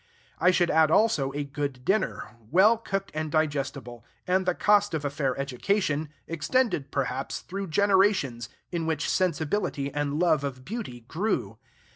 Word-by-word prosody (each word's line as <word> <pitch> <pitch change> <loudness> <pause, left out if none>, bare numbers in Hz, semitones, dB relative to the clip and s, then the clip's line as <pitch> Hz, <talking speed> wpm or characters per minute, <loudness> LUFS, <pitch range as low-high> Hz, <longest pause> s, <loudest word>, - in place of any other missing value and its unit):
I 180 - +5
should 180 -1 +3
add 160 -1 +4
also 160 -8 +3
a 145 +1 -2
good 140 -2 -5
dinner, 195 - -1
well 195 +8 +6
cooked 195 -3 -4
and 155 0 -3
digestible; 140 -6 -2 0.2
and 185 +1 +1
the 180 - +2
cost 205 -3 +3
of 150 -2 -3
a 140 - -1
fair 140 -3 -1
education, 145 - -1 0.2
extended, 165 - 0
perhaps, 135 -1 -2
through 195 +1 -5
generations 190 - +2 0.2
in 170 -2 -2
which 160 -3 -1
sensibility 160 -4 -1
and 145 0 -1
love 160 -5 +3
of 130 -2 -5
beauty 205 - -6
grew. 120 - -2
155 Hz, 150 wpm, -27 LUFS, 140-190 Hz, 0.2 s, well